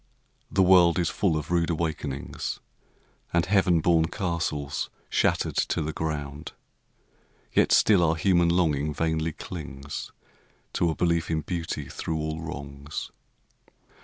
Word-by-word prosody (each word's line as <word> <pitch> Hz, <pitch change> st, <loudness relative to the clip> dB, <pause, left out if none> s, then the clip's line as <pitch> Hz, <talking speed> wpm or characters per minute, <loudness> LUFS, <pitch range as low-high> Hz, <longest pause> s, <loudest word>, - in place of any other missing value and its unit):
The 95 Hz, -, +3 dB
world 90 Hz, -2 st, +6 dB
is 85 Hz, -3 st, +1 dB
full 85 Hz, -6 st, +1 dB
of 75 Hz, +2 st, -5 dB
rude 85 Hz, -1 st, +2 dB
awakenings 80 Hz, -4 st, -3 dB, 0.7 s
And 85 Hz, -1 st, +2 dB
heaven 90 Hz, -3 st, +3 dB
born 80 Hz, -1 st, +3 dB
castles 80 Hz, -6 st, -2 dB, 0.2 s
shattered -, -, +1 dB
to 80 Hz, -, +1 dB
the 80 Hz, +1 st, -3 dB
ground, 75 Hz, -1 st, -4 dB, 1.0 s
Yet -, -, +3 dB
still 100 Hz, -5 st, +5 dB
our 80 Hz, -1 st, +3 dB
human 85 Hz, 0 st, +3 dB
longing 75 Hz, -4 st, +1 dB
vainly 80 Hz, 0 st, 0 dB
clings 70 Hz, -6 st, -7 dB, 0.6 s
To 85 Hz, -, +2 dB
a 80 Hz, -, -1 dB
belief 85 Hz, -1 st, +1 dB
in 80 Hz, -1 st, 0 dB
beauty 80 Hz, -3 st, -4 dB
through 80 Hz, -, -3 dB
all 80 Hz, +1 st, -3 dB
wrongs. 70 Hz, -2 st, -6 dB
80 Hz, 130 wpm, -26 LUFS, 75-85 Hz, 1.0 s, world